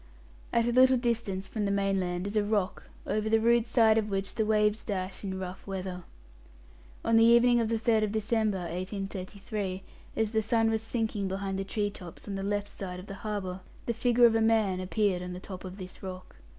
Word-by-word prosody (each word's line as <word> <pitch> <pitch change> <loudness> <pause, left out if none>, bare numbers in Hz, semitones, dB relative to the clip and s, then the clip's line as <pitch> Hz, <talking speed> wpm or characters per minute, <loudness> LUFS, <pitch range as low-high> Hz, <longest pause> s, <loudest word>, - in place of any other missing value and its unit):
At 230 0 +2
a 240 - +1
little 255 +1 +6
distance 230 -6 -1
from 215 -2 -2
the - - 0
mainland 195 -2 0
is 200 +2 -4
a 210 - +3
rock, 205 -2 -1 0.2
over 215 0 -1
the 225 0 +4
rude 235 +1 +3
side 225 -2 +5
of 215 -1 -3
which 195 0 -2
the 220 -2 0
waves 210 0 +2
dash 190 -2 -4
in 190 -1 -3
rough 185 +1 -7
weather. 185 -2 -5 1.0
On 230 - +4
the 225 - +7
evening 235 +1 +6
of 225 -2 0
the 230 - +1
3rd 220 -2 +2
December, 220 -1 +1
1833, 195 +2 -4 0.3
as 220 -1 0
the 220 -1 +2
sun 225 0 +2
was 220 -1 0
sinking 220 -3 -2
behind 195 0 -3
the - - -1
tree 205 +1 -1
tops 180 -1 -11
on 200 - -4
the 195 - -3
left 205 +1 -1
side 180 -3 -6
of 185 - -9
the 195 - -7
harbour, 200 -4 -3 0.3
the 235 - 0
figure 240 +1 +4
of 230 - +6
a 225 - +2
man 220 -4 +3
appeared 185 0 0
on 180 0 -5
the 180 - -6
top 185 -1 -8
of 185 0 -8
this 185 -2 -9
rock. 185 -1 -8
205 Hz, 210 wpm, -29 LUFS, 190-225 Hz, 1.0 s, the